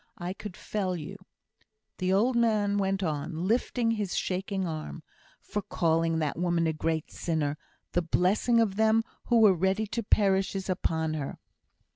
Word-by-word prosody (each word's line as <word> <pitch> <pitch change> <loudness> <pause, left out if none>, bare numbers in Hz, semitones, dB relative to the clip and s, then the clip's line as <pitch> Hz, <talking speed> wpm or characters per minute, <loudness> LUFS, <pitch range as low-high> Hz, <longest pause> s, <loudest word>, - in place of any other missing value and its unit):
I 175 +1 -4
could 200 -2 -9
fell 190 -4 -2
you," 175 +4 -6 0.8
the 185 0 +1
old 230 +6 +3
man 210 -3 +2
went 195 0 0
on, 155 +1 -2
lifting 230 +2 +1
his 210 -5 -2
shaking 190 +1 -1
arm, 155 0 -6 0.4
"for 210 - -4
calling 165 -4 +1
that 155 0 -1
woman 170 -1 +1
a 160 - +1
great 160 0 -2
sinner. 155 -4 -1 0.4
The 175 - +1
blessing 190 +8 +2
of 205 -4 +1
them 220 +1 +4 0.2
who 240 -1 +3
were 215 -3 +7
ready 190 +5 +1
to 225 +3 -3
perish 195 -2 +2
is 190 0 -2
upon 160 -3 -1
her." 145 -3 -4
190 Hz, 160 wpm, -28 LUFS, 165-210 Hz, 0.8 s, were